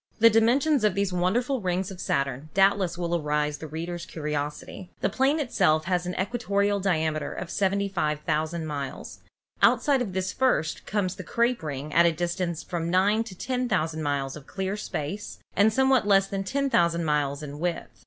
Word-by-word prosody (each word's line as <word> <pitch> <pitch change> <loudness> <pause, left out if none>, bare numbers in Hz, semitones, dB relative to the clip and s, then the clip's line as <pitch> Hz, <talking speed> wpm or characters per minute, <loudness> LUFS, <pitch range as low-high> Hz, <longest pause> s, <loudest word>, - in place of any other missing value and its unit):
The 230 0 +7
dimensions 250 +6 +3
of 210 -3 +3
these 200 -2 0
wonderful 230 +9 0
rings 185 0 -1
of 185 - -8
Saturn 140 +1 -1
doubtless 195 -2 +3
will 175 -1 -1
arouse 150 -2 -1
the 160 - -7
reader's 170 +3 -5
curiosity. 150 +4 -5
The - - +2
planet 275 +1 +1
itself 155 -7 +2
has 180 -1 0
an 180 - -4
equatorial 200 -1 0
diameter 160 -5 0
of 175 - -6
75,000 165 -5 -1
miles. 140 -3 -6 0.4
Out - - +5
side 280 -4 +3
of 205 -7 -3
this 185 0 -2
first 250 -12 0
comes 195 -3 -1
the 185 - -6
crape 235 +6 0
ring 150 -1 -5
at 170 +1 +6
a - - +3
distance 170 0 -2
of - - -26
from 170 -2 -2
nine 200 +5 +3
to 200 -5 -9
ten 250 +2 -2
thousand 160 -4 0
miles 140 -2 -1
of 150 -2 -11
clear 190 +1 -3
space, 205 -1 -5 0.2
and 210 +2 +5
somewhat 265 -1 +3
less 195 -1 +5
than 195 0 -3
10,000 175 -9 +1
miles 145 -1 0
in 145 0 -7
width. 175 0 -3
180 Hz, 180 wpm, -26 LUFS, 155-205 Hz, 0.4 s, The